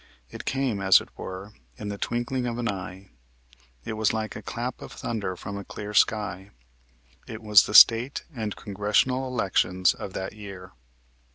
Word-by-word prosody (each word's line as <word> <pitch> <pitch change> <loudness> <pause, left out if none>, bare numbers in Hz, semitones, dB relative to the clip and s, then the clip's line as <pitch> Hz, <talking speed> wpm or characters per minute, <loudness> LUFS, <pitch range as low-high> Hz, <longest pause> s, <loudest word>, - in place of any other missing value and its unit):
It - - -8
came, 130 -6 -1
as 95 -1 +7
it - - -11
were, 95 +3 -8 0.2
in 105 - -6
the 100 - -4
twinkling 125 +1 -2
of 120 -1 -3
an 120 -1 -2
eye. 95 -1 -6 0.7
It - - -3
was 110 0 +1
like 110 -1 -3
a - - -6
clap - - -5
of - - -9
thunder 105 -5 -4
from 100 +3 -7
a - - -7
clear 105 +2 -7
sky. 100 -3 +1 0.8
It 110 0 -8
was 105 -3 +6
the 105 - -3
State 120 +5 +7
and 110 -3 -3
Congressional 105 +6 0
elections 95 -6 +1
of 95 - -8
that 95 +1 -4
year. 100 -4 -10
105 Hz, 170 wpm, -26 LUFS, 95-115 Hz, 0.8 s, as